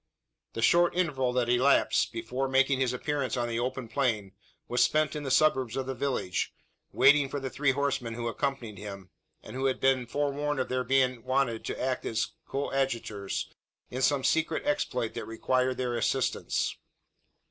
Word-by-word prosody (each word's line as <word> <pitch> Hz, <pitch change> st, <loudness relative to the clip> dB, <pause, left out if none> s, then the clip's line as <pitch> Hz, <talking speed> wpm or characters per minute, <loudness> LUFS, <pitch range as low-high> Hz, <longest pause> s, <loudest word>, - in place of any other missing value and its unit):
The 115 Hz, -, -3 dB
short 175 Hz, +5 st, +4 dB
interval 140 Hz, -8 st, +1 dB
that 125 Hz, -1 st, +1 dB
elapsed, 125 Hz, +3 st, +3 dB
before 120 Hz, +4 st, -3 dB
making 130 Hz, 0 st, +3 dB
his 130 Hz, -2 st, +2 dB
appearance 135 Hz, +1 st, -2 dB
on 120 Hz, -1 st, 0 dB
the 115 Hz, 0 st, -2 dB
open 125 Hz, 0 st, -3 dB
plain, 110 Hz, -5 st, -1 dB, 0.4 s
was 125 Hz, -, +3 dB
spent 155 Hz, 0 st, +2 dB
in 150 Hz, -, -3 dB
the 140 Hz, -, -4 dB
suburbs 130 Hz, -4 st, +3 dB
of 135 Hz, -, -1 dB
the 135 Hz, -, -3 dB
village 125 Hz, -8 st, -2 dB, 0.4 s
waiting 135 Hz, +1 st, +5 dB
for 145 Hz, -, -3 dB
the 135 Hz, -1 st, -5 dB
three 140 Hz, 0 st, +1 dB
horsemen 135 Hz, -4 st, -1 dB
who 120 Hz, 0 st, -3 dB
accompanied 115 Hz, -5 st, -3 dB
him, 100 Hz, -2 st, -8 dB, 0.3 s
and -, -, -10 dB
who 135 Hz, +1 st, -2 dB
had 130 Hz, -1 st, +1 dB
been 130 Hz, -2 st, +2 dB
forewarned 145 Hz, +2 st, -1 dB
of 130 Hz, -, -1 dB
their 130 Hz, 0 st, 0 dB
being 130 Hz, -2 st, +2 dB
wanted 130 Hz, -3 st, 0 dB
to -, -, -4 dB
act 130 Hz, 0 st, -1 dB
as 110 Hz, -, -3 dB
his -, -, 0 dB, 0.2 s
coadjutors, 135 Hz, -7 st, -2 dB, 0.4 s
in 130 Hz, -, -3 dB
some 135 Hz, +1 st, +2 dB
secret 160 Hz, +2 st, +1 dB
exploit 125 Hz, -, -1 dB
that -, -, -5 dB
required 130 Hz, +3 st, 0 dB
their 125 Hz, -1 st, -1 dB
assistance. 125 Hz, +2 st, 0 dB
130 Hz, 175 wpm, -29 LUFS, 120-140 Hz, 0.4 s, waiting